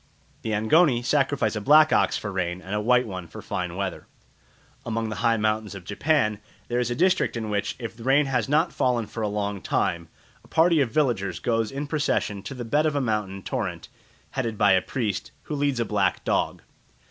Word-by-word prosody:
The - - -4
Angoni 120 +3 +3
sacrifice 140 -2 +1
a 105 - -2
black 155 +6 +6
ox - - +3
for 105 - -5
rain 90 -2 -2
and 95 +2 -7
a 105 - 0
white 125 +3 +3
one 95 -5 -6
for 80 - -10
fine 90 -1 -4
weather. 95 -1 -4 0.8
Among 115 -1 -2
the 105 - -5
high 115 -1 +2
mountains 110 -1 -1
of 95 - -8
Japan 110 - +1 0.3
there 120 0 0
is 125 -1 0
a 120 - -1
district 185 -6 +2
in 110 -2 -4
which, 100 -1 -1
if 115 -1 -7
rain 135 +3 +4
has 130 -3 -1
not 155 +4 +2
fallen 120 -3 +1
for 115 - -7
a 105 - 0
long 100 -1 -2
time, 85 -1 -1 0.4
a - - -19
party 165 -1 +4
of 130 - +1
villagers 110 - 0
goes 115 -2 0
in 140 +2 -4
procession 145 -9 -1
to 135 - -7
the 120 -1 -5
bed 150 +7 +2
of 150 - -1
a - - +2
mountain 105 -6 -2
torrent, - - -4 0.4
headed 115 -5 -2
by 105 -1 +4
a 95 -1 +5
priest, 110 -5 -3
who - - -6
leads 140 -3 0
a 115 - +1
black 100 -3 0
dog. - - -1
115 Hz, 205 wpm, -25 LUFS, 100-135 Hz, 0.8 s, black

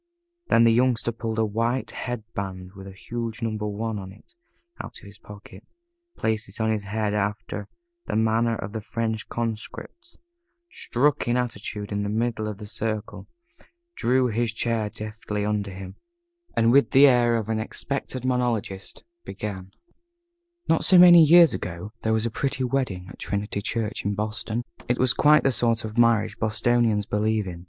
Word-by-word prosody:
Then 115 - +5
the 115 -1 +5
Youngster 120 -1 +2
pulled 115 -1 -4
a 110 - +2
white 115 +4 -1
head 125 -3 -5
band 95 -2 -5
with 95 -1 -11
a - - -8
huge 115 +4 -5
"Number 110 -2 -2
One" 105 +1 -3
on 95 -1 -8
it, 100 - -18 0.5
out - - -10
of - - -16
his 100 0 -14
pocket, 100 -1 -13 0.5
placed 110 -2 -1
it 100 - -13
on 110 0 +1
his 105 -2 -2
head 105 +1 -1
after 105 0 -3 0.4
the - - -2
manner 110 +1 +2
of 100 -1 -6
the 110 - -4
French 110 0 -3
Conscripts, 120 - -6 0.5
struck 145 +3 0
an 120 +1 +2
attitude 105 -3 -4
in 100 0 -1
the 100 - -2
middle 110 0 -1
of 105 -2 -5
the 105 - -9
circle, 110 0 -4 0.7
drew 130 +1 +2
his 115 +1 0
chair 115 -2 -1
deftly 105 -1 -5
under 105 -1 -1
him, 95 0 -9 0.6
and 115 0 +4
with 140 +2 +5
the 135 +2 +7
air 120 -3 +4
of 110 -2 -2
an 110 -1 -1
experienced 130 +2 -4
monologist 120 -6 -2 0.2
began: 95 - -6 1.0
Not 165 - +2
so 185 - +6
very 180 0 +10
many 170 -1 +9
years 170 -1 +7
ago 90 +4 -5
there 110 - 0
was 110 0 +1
a 115 - -1
pretty 135 +2 -2
wedding 120 -8 -2
at - - -12
Trinity 100 0 -3
Church 115 +2 -3
in 100 0 -1
Boston. 110 +2 -3 0.2
It 125 - +1
was 130 -1 +3
quite 150 +1 +5
the 135 - +3
sort 115 -2 0
of 110 0 -7
marriage 115 -2 +3
Bostonians 110 -1 +1
believe 105 +1 0
in. 90 -2 -7
110 Hz, 175 wpm, -25 LUFS, 105-120 Hz, 1.0 s, very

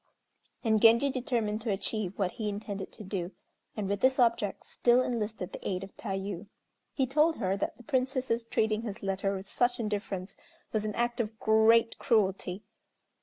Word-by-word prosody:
And 220 -3 +3
Genji 235 +5 +6
determined 235 -4 -1
to 230 - -3
achieve 195 0 -2
what 190 -3 0
he 220 -3 -3
intended 200 -1 -5
to 220 - -9
do, 190 -2 -4 0.4
and 205 -2 -1
with 200 0 -1
this 260 +3 +3
object 230 -5 +1
still 245 +1 +3
enlisted 215 -6 -3
the - - -6
aid 185 0 -2
of 195 - -10
Tayû. 195 -2 -4 0.4
He 265 - +1
told 305 +5 +3
her 190 -3 0
that - - -3
the 245 - -14
Princess's 255 -1 0
treating 220 -1 0
his 215 -2 -6
letter 195 0 0
with 190 +1 -7
such 245 +2 +1
indifference 200 -3 -3 0.4
was 215 -1 0
an 210 - -3
act 240 0 0
of 220 -1 -3
great 225 +1 +4
cruelty. 195 -2 +1
215 Hz, 170 wpm, -30 LUFS, 195-235 Hz, 0.4 s, Genji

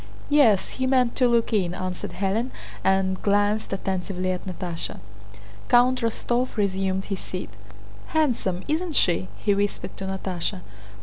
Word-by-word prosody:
"Yes, 235 -10 +5
he 260 - +2
meant 255 -2 +3
to 250 - +5
look 235 -1 +2
in," 180 -4 +1
answered 185 -1 -4
Hélène, 205 +6 0 0.3
and 190 -1 +2
glanced 205 +1 +2
attentively 185 -1 -2
at 185 +1 -4
Natásha. 175 -2 -4 0.7
Count 250 +1 +5
Rostóv 240 +2 -1
resumed 190 -1 0
his 195 -2 -3
seat. 180 - -6 0.6
"Handsome, 235 - 0
isn't 320 +1 -1
she?" 165 - +3
he 205 - +2
whispered 200 +1 -2
to 195 - -5
Natásha. 185 - -2
195 Hz, 135 wpm, -25 LUFS, 185-240 Hz, 0.7 s, Yes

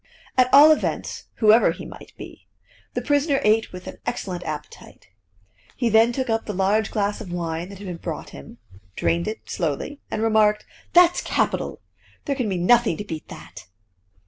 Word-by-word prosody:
At 255 0 +3
all 295 +3 +9
events, 310 - -2
whoever 220 +1 +5
he - - -8
might - - -12
be, - - -12 0.5
the - - -2
prisoner 285 -1 +2
ate 220 +1 +2
with 180 0 -10
an - - -8
excellent 180 -2 -4
appetite. 150 -1 -8 0.7
He 240 -3 0
then 225 +2 +5
took 260 +2 -3
up 225 -1 -1
the 210 - -4
large 200 +3 +1
glass 205 -1 -1
of 190 -5 -8
wine 170 0 -4
that 200 - -10
had 200 - -10
been 180 -2 -5
brought - - -6
him, 70 +12 -12 0.4
drained 170 +2 0
it 215 - -6
slowly, 175 - -3
and 220 - -2
remarked: 215 -1 +3 0.3
"That's 350 0 +5
capital! - - -1 0.4
There 280 - -1
can 250 -6 -2
be 190 - -1
nothing 220 0 +3
to - - -5
beat 160 -6 -7
that!" - - -12
215 Hz, 175 wpm, -23 LUFS, 180-240 Hz, 0.7 s, all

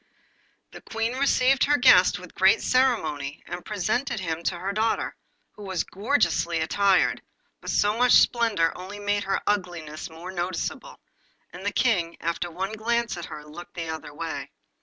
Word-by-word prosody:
The - - -11
Queen 225 +1 -2
received 260 0 +3
her 290 +1 +3
guest 190 -9 +6
with 180 -1 -12
great 190 +4 +4
ceremony, 160 - 0
and 175 0 -6
presented 220 +5 -1
him 165 -3 -3
to 175 - 0
her 190 +3 -3
daughter, 220 +2 0 0.4
who - - -15
was 190 -3 -2
gorgeously 200 -6 0
attired, 190 +3 +2 0.4
but - - -8
so 205 +1 +2
much 250 +1 +4
splendour 220 -9 +3
only 190 +3 -8
made 205 0 -1
her 195 - 0
ugliness 175 -5 -3
more 165 +3 -9
noticeable, 180 0 -4 0.5
and - - -9
the - - 0
King, 180 -9 +1
after 170 +1 -2
one 190 +5 -4
glance 235 +2 -1
at 170 - -6
her, 150 0 -9
looked 160 +4 -11
the 165 -2 -4
other 160 -2 -6
way. 165 +2 -5
190 Hz, 160 wpm, -25 LUFS, 170-225 Hz, 0.5 s, guest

